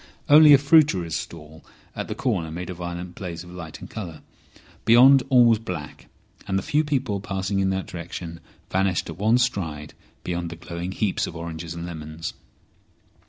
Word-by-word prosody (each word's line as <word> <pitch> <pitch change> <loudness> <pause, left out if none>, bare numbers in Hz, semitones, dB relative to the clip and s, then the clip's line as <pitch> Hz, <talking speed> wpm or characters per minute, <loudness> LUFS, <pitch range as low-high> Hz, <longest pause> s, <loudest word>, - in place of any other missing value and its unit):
Only 150 +1 +8
a 140 - +10
fruiterer's 140 - +3
stall 80 +1 -8 0.3
at - - -4
the - - -4
corner 95 -11 -1
made 90 +3 -6
a - - -4
violent 85 0 -6
blaze 85 -3 -6
of 90 - -13
light 85 -3 -9
and - - -8
colour. 85 -8 -7 0.6
Beyond 130 +4 +7
all 125 -3 +6
was 115 -2 +4
black, 85 -10 -7 0.4
and 95 - 0
the 95 - -2
few 150 +1 +1
people 130 -9 -1
passing 95 0 -2
in 95 0 +2
that 95 0 -2
direction 85 -1 -7 0.3
vanished 95 -2 0
at - - -11
one 110 +4 +4
stride 80 -12 -2 0.3
beyond 85 -1 -3
the 85 - -7
glowing 85 +1 -6
heaps 95 0 -1
of - - -8
oranges 85 0 -6
and 85 0 -5
lemons. 80 -1 -6
90 Hz, 175 wpm, -24 LUFS, 85-110 Hz, 0.6 s, a